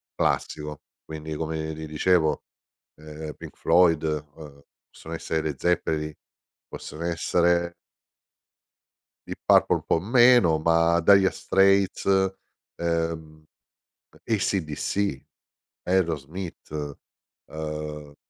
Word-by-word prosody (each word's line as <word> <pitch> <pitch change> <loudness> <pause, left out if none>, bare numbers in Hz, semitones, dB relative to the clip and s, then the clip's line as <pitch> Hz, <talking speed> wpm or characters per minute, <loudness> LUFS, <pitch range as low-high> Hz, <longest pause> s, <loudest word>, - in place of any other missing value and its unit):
classico, 75 -1 -2 0.2
quindi 80 0 -7
come 80 0 -3
ti 80 0 -7
dicevo 80 +1 +1 0.5
ehm, 75 0 -8
Pink - - -11
Floyd 80 -2 +4
uhm, 75 -1 -5 0.3
possono 80 - -10
essere 80 0 -2
i - - -9
Led 75 -4 -4
Zeppelin, 80 -3 0 0.6
possono 80 +3 -8
essere 85 +1 +1 1.5
Deep - - -6
Purple - - +5
un - - -4
po' 80 - +2
meno, 120 -5 +5
ma 85 +1 +3
Dire 95 +1 +5
Straits, 95 0 +2 0.7
ehm, 80 -2 -3 0.8
AC/DC, 95 -4 -1 0.6
Aerosmith, 80 -3 -3 0.5
ehm 75 -1 -6
80 Hz, 90 wpm, -25 LUFS, 75-85 Hz, 1.5 s, Purple